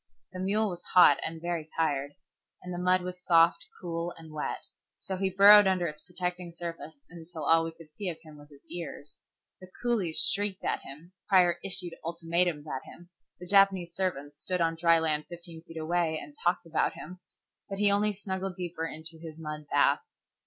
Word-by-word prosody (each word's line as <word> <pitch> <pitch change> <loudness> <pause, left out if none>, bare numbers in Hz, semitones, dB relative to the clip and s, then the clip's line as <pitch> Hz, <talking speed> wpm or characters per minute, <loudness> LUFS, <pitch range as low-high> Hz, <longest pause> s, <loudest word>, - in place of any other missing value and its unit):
The 185 - -6
mule 205 +3 +1
was 175 -1 -7
hot 180 - +8
and 165 0 -4
very 170 -2 -3
tired, 145 -3 0 0.5
and 180 0 -6
the 175 - -4
mud 180 0 +3
was 180 0 -7
soft, 165 -1 +4
cool, 170 0 -4
and 160 -1 -12
wet, 150 - -4 0.3
so 190 - -5
he 190 +1 0
burrowed 200 +2 +8
under 185 -2 +2
its 150 -2 -5
protecting 180 -1 -5
surface 165 -4 -8
until 165 -1 -9
all 165 +1 +4
we 165 - -4
could 165 -1 -16
see 200 -3 -3
of 165 - -5
him 155 -2 -13
was 145 0 -15
his 140 -1 -18
ears. 150 -4 -8 0.4
The 185 - -13
coolies 210 -10 0
shrieked 205 -1 -1
at - - 0
him, 150 +6 -12 0.2
Prior 180 -3 +4
issued 180 -3 -1
ultimatums 170 -1 -1
at 130 -4 -5
him, 175 +1 -15 0.3
the 180 - -8
Japanese 190 -2 +4
servants 145 -6 -3
stood 185 -1 -2
on 165 -1 +2
dry 165 0 +4
land 155 -2 0
fifteen 170 -1 -10
feet 165 0 -12
away 160 0 0
and 290 - -10
talked 175 0 +1
about 165 -1 0
him, 180 +3 -10 0.5
but 195 - -4
he 205 0 +4
only 210 +1 +3
snuggled 190 -2 -4
deeper 170 -2 -4
into 160 +1 -9
his 160 -2 -9
mud 150 -1 -6
bath. - - +4
170 Hz, 190 wpm, -29 LUFS, 160-185 Hz, 0.5 s, hot